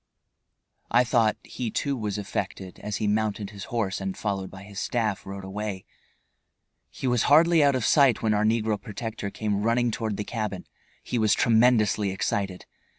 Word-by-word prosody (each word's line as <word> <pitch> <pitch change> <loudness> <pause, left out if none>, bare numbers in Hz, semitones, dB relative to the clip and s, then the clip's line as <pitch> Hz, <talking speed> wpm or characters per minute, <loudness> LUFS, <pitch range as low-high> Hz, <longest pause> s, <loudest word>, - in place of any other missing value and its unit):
I 120 +1 +5
thought, 115 -3 +2
he 120 -3 -4
too 140 +5 -1
was 105 -4 -3
affected 95 -2 -5
as 105 -1 -4
he 105 - -1
mounted 105 -1 0
his 100 -2 -8
horse 105 -5 -2
and, 95 -1 -4
followed 95 -3 -2
by 95 +1 -11
his 100 -1 -8
staff, 110 -6 -1
rode 95 0 -6
away. 95 0 -5 1.0
He - - -7
was 125 -2 +2
hardly 160 +2 +6
out 140 -1 +4
of 125 -4 0
sight 135 -7 +4
when 110 -1 +2
our 105 0 +2
negro 110 -1 +1
protector 110 -2 -5
came 105 0 -2
running 120 +2 +2
toward 110 -2 -3
the 105 - -2
cabin. 105 -4 -4 0.4
He 120 - -2
was 110 -2 +4
tremendously 110 -3 +3
excited. 95 -1 -2
105 Hz, 170 wpm, -26 LUFS, 100-115 Hz, 1.0 s, hardly